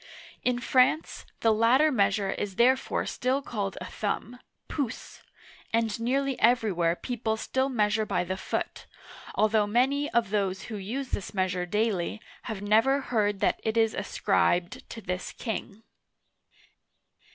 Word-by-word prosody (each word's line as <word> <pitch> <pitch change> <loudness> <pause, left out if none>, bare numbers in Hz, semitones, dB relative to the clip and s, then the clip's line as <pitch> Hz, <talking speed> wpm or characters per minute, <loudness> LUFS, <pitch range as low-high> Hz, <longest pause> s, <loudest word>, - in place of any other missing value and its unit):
In 250 -1 +1
France, 255 +5 +2
the 225 -1 +4
latter 250 +8 +4
measure 200 -4 +2
is 195 -1 -4
therefore 255 +4 +2
still 255 +2 0
called 200 -6 -3
a - - -6
thumb 225 +3 -4 0.3
{pouce\ 265 -6 -4 0.5
and 225 -1 0
nearly 270 +3 0
every 230 -2 +4
where 170 -1 +1
people 220 0 -2
still 260 +4 0
measure 215 -3 +1
by 205 - 0
the 185 +1 -3
foot, 190 - -4 0.5
although 215 -1 +3
many 270 +6 +2
of 235 -4 +1
those 195 -3 0
who 220 - -6
use 245 +7 -4
this 200 - -4
measure 185 -1 0
daily 210 -1 0 0.3
have 210 -3 -4
never 225 +7 +4
heard 210 -6 0
that - - +2
it 220 +1 -1
is 225 -1 +3
ascribed 180 -3 0
to 225 - -7
this 180 -1 -4
king. 220 -2 -5
220 Hz, 140 wpm, -28 LUFS, 200-250 Hz, 0.5 s, the